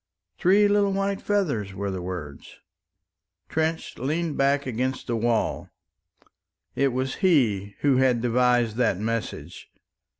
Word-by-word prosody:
"Three 200 +3 +5
little 205 -1 +2
white 195 0 -1
feathers," 140 - -1
were 100 0 -3
the 95 -1 -4
words. 85 -6 -7 0.9
Trench 160 +1 -2
leaned 155 +4 -1
back 140 +1 +2
against 130 +1 -2
the 120 - -2
wall. 115 0 -1 1.1
It 140 - +2
was 130 +2 -2
he 110 - +2
who 140 -3 +3
had 130 -2 +3
devised 120 -1 +2
that 120 -7 +2
message. 115 +2 -4
125 Hz, 125 wpm, -25 LUFS, 110-160 Hz, 1.1 s, Three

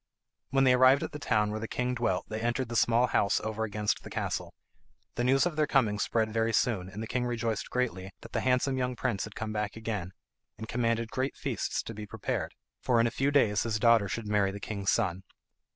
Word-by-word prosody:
When 135 +1 +3
they 130 -1 +6
arrived 130 +2 +5
at - - -4
the 150 - -7
town 105 -6 +1
where 110 - -3
the 115 - -4
king 125 +2 -1
dwelt 120 -7 0
they 110 0 -4
entered 120 +1 -1
the 120 - -4
small 120 +1 +4
house 100 -5 +2
over 110 0 -2
against 105 0 -1
the - - -10
castle. - - -3 0.6
The 120 - -2
news 135 +4 +4
of 175 -3 -1
their 155 -1 +2
coming 110 -8 +2
spread 110 0 0
very 115 0 +1
soon, 105 -6 +1
and 105 +3 -6
the - - -5
king 125 +2 -1
rejoiced 115 -4 -2
greatly 110 -7 -2
that - - -11
the - - 0
handsome 130 +1 +1
young 125 0 -1
prince 120 -6 -1
had 110 - -11
come 110 -1 -4
back 105 -1 -2
again, 105 -5 -4 0.4
and 110 - -7
commanded 115 -1 0
great 130 +2 -2
feasts - - -2
to 115 - -7
be 105 -1 -7
prepared, 110 -1 -3 0.3
for 120 -2 +2
in 115 - +4
a 115 - +1
few 135 +4 +1
days 115 -8 +3
his 110 -2 0
daughter 115 -3 +4
should 115 +2 -3
marry 105 -2 +2
the 100 +1 -6
king's 100 -1 -3
son. 95 -5 +1
115 Hz, 230 wpm, -29 LUFS, 105-125 Hz, 0.6 s, they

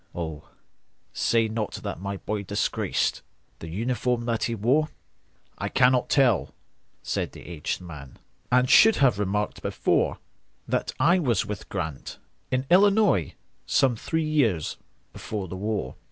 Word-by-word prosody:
Oh, 80 -3 -6 0.6
say 115 -1 +2
not 110 -1 -3
that - - -5
my 100 0 -4
boy 105 +1 -3
disgracedThe 95 -4 -3
uniform 120 +4 -1
that 115 -2 0
he 115 - -2
wore!""I 135 +9 -3
cannot 125 -1 +3
tell," 130 -7 +2 0.5
said - - -2
the - - -12
aged 85 0 -4
man,"And 85 - -3
should 220 +10 +7
have 125 -7 +3
remarked 105 +1 -1
before, - - 0 0.5
That - - -1
I 175 +4 +4
was 120 - +1
with 105 -2 -6
Grant,—in 80 - -5
Illinois,—Some 185 - +2
three 160 +8 -2
years 115 - +1 0.4
before 105 -3 -5
the 90 - -6
war." 105 -9 -3
110 Hz, 120 wpm, -26 LUFS, 95-130 Hz, 0.6 s, should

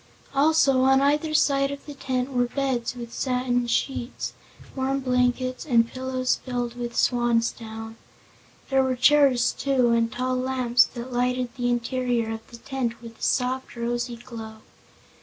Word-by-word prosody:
Also, 280 -2 +4
on 265 +1 +5
either 295 +3 +1
side 275 -2 +3
of 280 0 -7
the 295 - -8
tent 260 -1 -2
were 245 -1 +2
beds, 255 -2 -2
with 235 -1 -8
satin 250 -2 0
sheets, 245 +1 -2 0.4
warm 270 +1 0
blankets 255 0 0
and 235 -5 +3
pillows 255 0 -1
filled 245 -2 -3
with 240 -1 -5
swansdown. 230 -2 0 0.7
There 270 0 +4
were 260 -1 +1
chairs, 255 -1 +4
too, 260 -4 +1
and 230 -1 +2
tall 255 +2 -1
lamps 255 -2 +3
that 245 +1 -6
lighted 250 0 0
the 245 -1 -1
interior 240 -1 0
of 225 0 -7
the 235 - -11
tent 240 -2 -3
with 230 -1 -12
a - - -21
soft, 255 0 0
rosy 240 0 -2
glow. 225 -2 -10
250 Hz, 150 wpm, -25 LUFS, 235-265 Hz, 0.7 s, on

